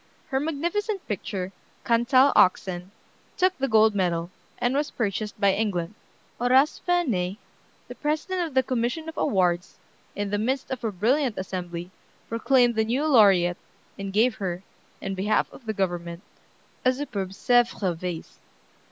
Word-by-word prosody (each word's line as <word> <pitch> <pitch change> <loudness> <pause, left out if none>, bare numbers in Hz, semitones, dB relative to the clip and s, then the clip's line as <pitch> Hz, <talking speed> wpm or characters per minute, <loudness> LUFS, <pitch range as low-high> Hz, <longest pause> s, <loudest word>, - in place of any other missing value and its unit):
Her 265 - +1
magnificent 345 +8 -2
picture, 190 -2 -4 0.3
"Cantal 255 +4 +4
Oxen," 180 0 +2 0.5
took 370 0 +3
the 270 - +1
gold 220 -1 +5
medal, 175 -3 -1 0.3
and 245 +1 0
was 290 +2 0
purchased 210 -1 -3
by 200 -2 +4
England. 190 -4 -1 0.5
Horace 260 +4 +3
Vernet, 225 - +1 0.5
the - - -7
president 310 +5 -2
of 290 - -12
the 260 - +4
commission 255 +6 -2
of 320 - -6
awards, 180 -8 0 0.4
in 205 -1 -3
the 205 - 0
midst 260 +5 -1
of 255 -2 -4
a 225 - 0
brilliant 240 +6 +1
assembly, 180 -2 -5 0.4
proclaimed 240 +1 +3
the 220 -1 +1
new 255 +7 0
laureate, 195 - +5 0.4
and 195 0 -5
gave 225 +5 +3
her, 180 -2 -3 0.4
in 195 - -3
behalf 195 +3 +1
of 240 - -14
the - - +1
government, 175 -2 -3 0.6
a 255 - +4
superb 235 -9 -4
Sèvres 210 -3 +1
vase. 170 -1 -6
220 Hz, 145 wpm, -25 LUFS, 185-265 Hz, 0.6 s, gold